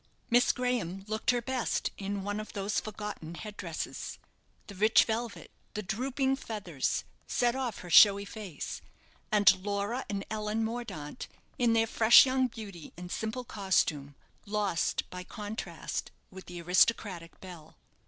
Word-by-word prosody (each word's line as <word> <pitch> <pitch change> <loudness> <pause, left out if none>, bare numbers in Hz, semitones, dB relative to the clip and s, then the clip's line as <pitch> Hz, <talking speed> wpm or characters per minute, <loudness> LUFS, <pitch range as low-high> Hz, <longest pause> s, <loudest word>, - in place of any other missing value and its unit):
Miss 245 +1 +5
Graham 210 -7 -2
looked 220 +1 -2
her 240 0 +3
best 255 -1 -1
in 200 0 -4
one 205 +1 -2
of 215 - -7
those 200 0 0
forgotten 210 -6 -6
headdresses; 195 -5 -5 0.5
the 200 - -10
rich 215 +3 +5
velvet, 230 0 -4 0.2
the 210 - -2
drooping 265 +7 0
feathers, 195 - -2 0.2
set 240 0 +1
off 255 -5 -3
her 180 - -9
showy 200 +1 +8
face, 200 -7 -6 0.5
and 200 -3 +5
Laura 205 +5 -1
and 200 -1 -3
Ellen 215 +1 -1
Mordaunt, 225 -8 -5 0.3
in 240 -2 +4
their 225 0 +4
fresh 225 +2 +7
young 260 0 +2
beauty 205 -8 -9
and 175 0 -8
simple 220 +3 -3
costume, 160 - 0 0.3
lost 205 -4 0
by 180 0 -6
contrast 210 +3 -5 0.2
with 190 0 -11
the 175 -1 -7
aristocratic 180 -1 +2
belle. 175 -4 -12
210 Hz, 140 wpm, -30 LUFS, 185-230 Hz, 0.5 s, showy